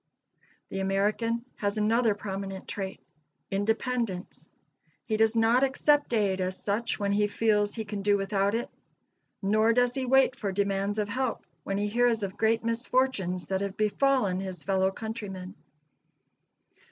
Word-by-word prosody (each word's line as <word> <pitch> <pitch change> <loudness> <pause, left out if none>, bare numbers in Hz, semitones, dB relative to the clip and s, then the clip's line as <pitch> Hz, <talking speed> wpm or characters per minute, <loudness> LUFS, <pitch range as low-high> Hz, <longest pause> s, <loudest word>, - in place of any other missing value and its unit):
The 195 - -4
American 210 +5 0
has 205 0 -1
another 220 +1 +2
prominent 195 -1 -6
trait 195 -1 -5 0.5
independence. 220 -1 -2 0.6
He 220 - -1
does 220 +1 +3
not 230 +2 +4
accept 285 +1 +2
aid, 200 -5 +1
as 185 0 -2
such, 210 +3 -1
when 200 -1 -1
he 205 +1 +2
feels 210 -1 +1
he 220 -2 -4
can 205 -1 -4
do 205 0 +3
without 200 +1 0
it: 235 - -3 0.7
nor 215 +3 +3
does 245 0 +3
he 260 -1 -1
wait 265 0 +4
for 210 -6 -3
demands 200 +1 0
of 210 -1 0
help, 255 +3 -2 0.2
when 195 +4 -2
he 205 +1 0
hears 235 0 +2
of 195 0 -4
great 225 +1 +1
misfortunes 230 -6 0
that 190 0 0
have 200 0 -4
befallen 215 -2 +2
his 185 -4 -6
fellow 190 -1 +2
countrymen. 195 -3 -6
210 Hz, 150 wpm, -28 LUFS, 195-230 Hz, 0.7 s, not